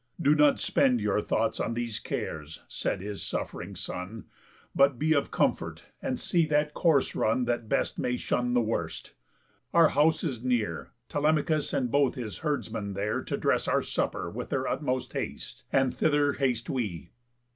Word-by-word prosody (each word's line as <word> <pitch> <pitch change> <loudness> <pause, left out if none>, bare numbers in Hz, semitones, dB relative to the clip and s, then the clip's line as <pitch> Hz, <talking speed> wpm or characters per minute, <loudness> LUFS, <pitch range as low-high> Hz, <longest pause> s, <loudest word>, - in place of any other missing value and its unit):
"Do 150 -3 +4
not 150 -1 +4
spend 125 -3 +3
Your 105 0 +1
thoughts 110 +1 0
on 115 - -1
these 120 -2 -3
cares," 80 0 -5
said 95 - -2
his 100 0 -5
suff'ring - - -4
son, 100 +5 -6 0.5
"But 140 -2 +4
be 160 +4 +2
of 140 - +1
comfort, - - 0 0.2
and - - -2
see 170 -3 +2
that 150 0 +1
course 155 -6 +3
run 120 +3 +1
That 120 -2 -2
best - - 0
may 125 0 0
shun 125 0 0
the 120 - +5
worst. 85 - -3 0.6
Our 165 -2 +7
house 155 +1 +3
is 125 -7 -3
near, 115 -10 -1 0.2
Telemachus 150 +1 +1
and 130 -4 0
both 140 -1 +3
his 115 -5 -5
herdsmen 115 -9 -2
there 105 +2 -1
To - - -3
dress - - +1
our - - +2
supper - - -2
with - - -6
their - - -1
utmost 130 0 -2
haste; - - -5
And 135 -1 +3
thither 145 -2 +2
haste 125 -3 0
we." 105 -10 -3
125 Hz, 165 wpm, -28 LUFS, 110-145 Hz, 0.6 s, Our